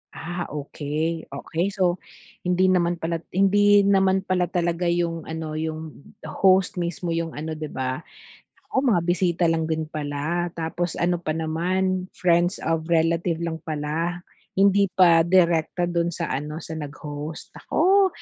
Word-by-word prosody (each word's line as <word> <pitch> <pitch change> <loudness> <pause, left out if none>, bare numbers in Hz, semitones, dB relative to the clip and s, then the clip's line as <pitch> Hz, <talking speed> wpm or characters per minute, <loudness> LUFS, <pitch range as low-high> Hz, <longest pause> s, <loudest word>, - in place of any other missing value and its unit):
Ah, 175 +2 -4
okey, 150 +2 -3
okey, 165 +6 -2
so 185 -3 0 0.5
hindi 185 +1 +3
naman 175 -1 +2
pala 165 0 -3 0.2
hindi 205 +1 +5
naman 190 -1 +3
pala 185 -2 +1
talaga 175 0 -1
yung 170 -1 -1
ano 160 -1 -5
yung 155 -2 -6
host 185 +5 +2
mismo 170 0 -3
yung 165 -1 -2
ano 155 +2 -4
'di 155 -1 -4
ba? 130 -1 -3 0.7
Nako, - - -7
mga 180 -8 +3
bisita 175 0 +1
lang 165 -1 +1
din 160 0 -1
pala 155 +3 -2
tapos 165 +1 -3
ano 175 0 0
pa 155 -2 -2
naman 185 +3 -1
friends 175 +1 +2
of 160 0 -1
relative 165 0 +2
lang 165 -1 -3
pala, 160 +4 -2 0.3
hindi 200 0 +4
pa 170 -3 +6
direkta 175 -1 +3
do'n 170 0 0
sa 170 0 -3
ano 150 +3 -3
sa 165 - -7
nag-host, 150 0 -7
nako. 385 +4 +3
170 Hz, 145 wpm, -24 LUFS, 160-180 Hz, 0.7 s, pa